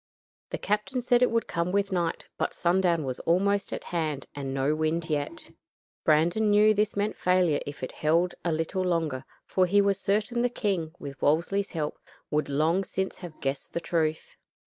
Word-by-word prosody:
The - - -3
captain 210 +4 -1
said 245 0 +3
it 250 - +5
would 230 0 +1
come 170 +1 -1
with 200 +1 +1
night, 170 -3 -1
but - - -2
sundown 175 -2 +2
was 130 -2 -4
almost 200 +4 +1
at - - -4
hand 155 -5 -2
and 140 -2 -4
no 135 +2 +1
wind 155 +1 -1
yet. 145 -1 -3 0.5
Brandon 170 +8 +3
knew 210 +1 +6
this 210 0 0
meant 205 +1 0
failure 180 -5 +2
if 145 -2 -7
it 130 - -3
held 170 +4 +1
a 170 - 0
little 165 +4 -1
longer, 165 -7 -1 0.2
for 185 -1 +2
he 200 +3 +4
was 200 -1 +2
certain 215 +4 +1
the 245 - +2
king, 190 -9 -1
with 140 -1 -9
Wolsey's 170 +7 +1
help, 155 -3 -3 0.3
would 150 -1 0
long 160 +7 +2
since 190 0 -3
have 175 -4 -9
guessed 135 0 -3
the - - 0
truth. 160 -2 -1
175 Hz, 185 wpm, -27 LUFS, 155-200 Hz, 0.5 s, knew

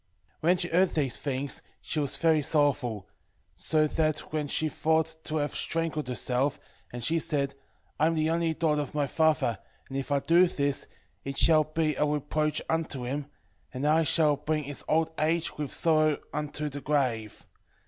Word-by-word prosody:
3:10 170 +3 +5
Whe - - -4
she 175 - 0
heard 180 +2 +4
these 140 -5 0
things, 140 0 -3 0.2
she 155 - -3
was 145 -3 +1
very 160 -2 +3
sorrowful, 135 - +1 0.5
so 155 -1 +1
that 155 -1 -1
she 155 - +1
thought 160 +1 +1
to 155 - -2
have 145 -2 -1
strangled 165 -3 -1
herself; 125 +2 -1 0.3
and 120 -1 -6
she 165 +1 +1
said, 140 -4 -1 0.5
I 155 - +4
am 165 - +1
the 155 0 +1
only 165 -1 0
daughter 150 -3 +1
of 145 0 -7
my 145 -1 +2
father, 145 -6 +1 0.3
and 135 - -7
if 135 +1 -3
I 140 - +3
do 170 +5 +5
this, 140 -4 -2 0.4
it 135 0 -5
shall 155 -2 +5
be 155 0 0
a 150 - +1
reproach 150 +1 -1
unto 160 -5 -2
him, 140 +3 -3 0.4
and 135 +1 -4
I 155 +2 +4
shall 150 -1 +3
bring 150 +1 -1
his 145 0 -5
old 160 +1 +2
age 160 +2 0
with 145 -2 -3
sorrow 155 -2 +3 0.2
unto 150 0 -3
the 145 0 -6
grave. 125 -8 -1
150 Hz, 180 wpm, -28 LUFS, 140-160 Hz, 0.5 s, 3:10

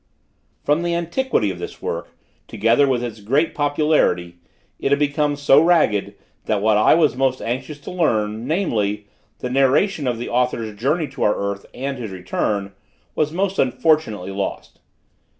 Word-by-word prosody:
From 150 +3 +2
the 170 0 -1
antiquity 170 - 0
of 90 - -8
this - - -7
work - - -4 0.4
together 115 +7 +2
with 125 -2 0
its 115 -3 -5
great 140 +10 +1
popularity, 145 - +1 0.4
it 135 - -1
had 140 - +5
become 145 0 +1
so 145 0 +5
ragged, 160 - +2 0.3
that 105 - 0
what 110 +1 +3
I 105 +7 +5
was 155 -5 +3
most 130 0 +1
anxious 130 +5 -4
to - - -8
learn, 110 -10 0
namely, 105 - -1 0.4
the 125 - -3
narration 135 +4 +2
of 120 -2 0
the 120 - -5
author's 120 -3 -1
journey 150 +9 0
to 135 -1 -10
our 105 - +3
earth 100 0 -4
and 135 0 -4
his 115 -3 -5
return, 100 +2 -2 0.4
was 150 -1 0
most 190 +3 -1
unfortunately 125 - +1
lost. 100 0 -5
130 Hz, 160 wpm, -21 LUFS, 105-150 Hz, 0.4 s, had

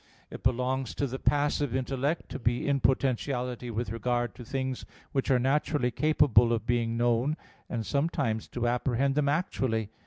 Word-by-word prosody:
It - - -8
belongs 125 +1 0
to 145 - 0
the 130 0 -4
passive 145 -3 +1
intellect 135 +4 -1
to - - -5
be 120 +3 0
in 140 -1 +2
potentiality 125 -2 0
with 115 -1 -3
regard 120 +1 -1
to 125 - -10
things 130 +1 -3 0.3
which 135 0 -1
are 130 - +5
naturally 135 0 +1
capable 135 -6 +4
of 115 -2 0
being 115 -1 0
known, 120 +5 +2 0.3
and 115 -2 -3
sometimes 140 -6 0
to 120 -1 -2
apprehend 125 +2 +1
them 145 0 +2
actually. 125 - -1
125 Hz, 160 wpm, -29 LUFS, 120-140 Hz, 0.3 s, are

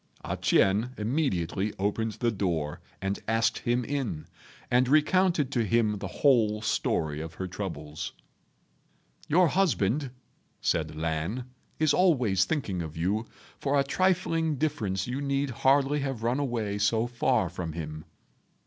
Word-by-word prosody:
A - - -2
ch'ien 105 +6 +2
immediately 105 - -1
opened 105 +3 -1
the 120 +1 0
door 85 -8 -2 0.2
and 95 +1 -1
asked 115 0 +2
him 120 0 0
in, 130 - -3 0.5
and 125 +1 +4
recounted 155 -1 +3
to 120 -4 +1
him 110 -1 +1
the 100 - -4
whole 110 -1 +3
story 80 -8 0
of 80 +1 -7
her 95 - -4
troubles. 80 -6 -5 1.2
"Your 170 +2 +4
husband," 140 - +1 0.5
said 80 -2 0
Lan, 80 +9 -2 0.3
"is 155 -2 +3
always 125 - +3
thinking 105 - -2
of 80 -1 -7
you. 100 +7 0 0.3
For 140 0 +1
a - - +4
trifling 165 0 +1
difference 115 -11 -1
you 130 +3 -3
need 140 -1 0
hardly 135 +4 +3
have 135 -5 -3
run 120 +4 +1
away 115 -7 -2
so 110 +3 +2
far 120 -3 +1
from 85 -2 -5
him." 75 -1 -6
115 Hz, 140 wpm, -28 LUFS, 95-140 Hz, 1.2 s, and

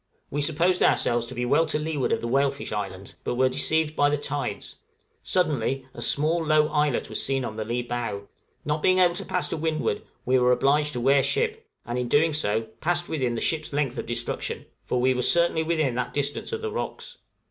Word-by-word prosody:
We 145 - -1
supposed 165 +5 +2
ourselves 120 -1 +2
to 130 - -8
be 125 - -1
well 145 +6 +3
to - - 0
leeward 150 -3 -1
of - - +1
the 115 - -3
Whalefish 140 +2 0
Islands, 100 -2 -5
but - - -2
were 130 +1 +3
deceived 155 +3 +1
by 145 -1 +4
the 150 - +1
tides; 140 -7 -4 0.4
suddenly 135 -7 0
a - - -8
small, 160 +3 +1
low 155 -1 +3
islet 150 -3 +1
was - - -3
seen 135 -1 0
on 110 - -5
the 110 - -3
lee 120 +3 -2
bow; 120 -4 -3 0.4
not 150 +1 -1
being 185 +3 +4
able 180 -2 +5
to 190 +3 -6
pass 180 - -1
to - - -2
windward, 155 -7 -1 0.2
we 130 +1 +3
were 125 0 +4
obliged 145 +4 +2
to 125 - -2
wear 135 +3 +4
ship, 450 - -1 0.2
and, 120 +1 -2
in 125 - -2
doing 155 +5 +3
so, 110 -7 +1 0.2
passed 175 +1 0
within 130 -6 -1
the - - -3
ship's 155 -2 -1
length 140 -4 -1
of - - -5
destruction 120 0 -3 0.2
for 125 - -1
we 130 +1 +3
were 125 - -1
certainly 170 +4 +3
within 155 -5 0
that 125 0 -3
distance 145 - -2
of 450 0 -4
the 440 - -2
rocks! - - -5
145 Hz, 215 wpm, -25 LUFS, 125-160 Hz, 0.4 s, able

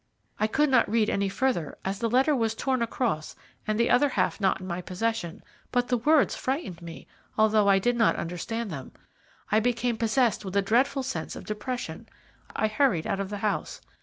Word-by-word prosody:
I 215 - +2
could 295 +5 +2
not 255 -5 +4
read 220 -1 +2
any 200 0 0
further, 240 - -1
as 195 +1 -2
the 230 0 0
letter 265 +5 +3
was 225 -3 0
torn 260 +1 0
across 225 -9 -2 0.3
and 215 +1 0
the 235 - +3
other 280 +4 +4
half 235 - 0
not 190 0 +2
in 185 - -8
my 180 -1 -3
possession, 185 -2 -3 0.3
but 245 -1 +1
the 250 - +2
words 290 +4 +3
frightened 255 - -3
me, 170 -1 -9 0.3
although 215 -1 +4
I 195 -1 +6
did 240 +5 +1
not 225 -2 +3
understand 205 +6 -4
them. 135 -4 -7 0.6
I 215 - +5
became 240 0 0
possessed 230 0 +1
with 190 -1 -6
a 200 - +4
dreadful 260 +6 +2
sense 265 0 -4
of - - -9
depression. 245 +4 -5 0.5
I - - +1
hurried 215 - +1
out 195 - -1
of 195 -1 -3
the 205 - -4
house. 210 - -2
220 Hz, 195 wpm, -27 LUFS, 195-245 Hz, 0.6 s, I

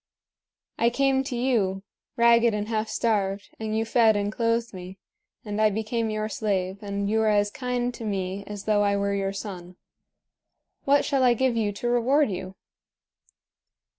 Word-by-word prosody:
I 235 - +4
came 270 +1 +1
to 260 - -4
you, 215 -7 0 0.3
ragged 235 -1 +5
and 210 0 -3
half 220 -1 -1
starved, 200 -3 -1
and 220 0 -2
you 225 - 0
fed 225 -1 +4
and 205 0 -1
clothed 230 0 0
me; 185 +1 -9 0.5
and 210 0 -2
I 215 - +5
became 220 +2 -2
your 215 0 -2
slave, 195 -3 -2
and 200 -1 -3
you 220 +2 +1
were 220 - +2
as 205 -1 +2
kind 250 0 -2
to 235 - -9
me 195 -2 -3
as 205 -1 -7
though 210 -1 +2
I 200 -1 +2
were 200 0 0
your 195 -1 -1
son. 185 -3 -7 1.1
What 280 +1 +3
shall 275 -2 +1
I 245 -2 +4
give 260 0 +1
you 215 -3 0
to 220 +4 -4
reward 245 +2 +2
you?" 185 +1 -6
215 Hz, 170 wpm, -25 LUFS, 200-235 Hz, 1.1 s, ragged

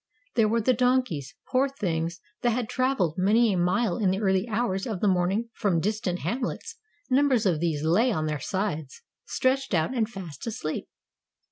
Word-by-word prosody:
There 220 -2 +3
were 230 +2 +1
the 255 +4 +3
donkeys, 250 - +1 0.2
poor 270 +2 +3
things, 170 -9 -2 0.2
that 240 - +3
had 240 -1 -1
traveled 255 - 0
many 215 +3 +4
a - - 0
mile 180 +3 +1
in 200 -4 +2
the 190 +1 0
early 190 0 +1
hours 215 -2 -1
of 215 -6 -3
the 210 - +1
morning 190 +5 +1
from 185 -5 +1
distant 190 -1 -1
hamlets; 260 - -3 0.4
numbers 260 -4 +3
of 175 -5 +2
these 160 -3 -1
lay 205 +11 +3
on 155 -7 -1
their 150 -2 -2
sides, 160 -5 -3 0.2
stretched 260 -5 +1
out 160 +8 +1
and 225 -2 +1
fast 185 - -8
asleep. 155 -8 -4
205 Hz, 175 wpm, -26 LUFS, 175-240 Hz, 0.4 s, many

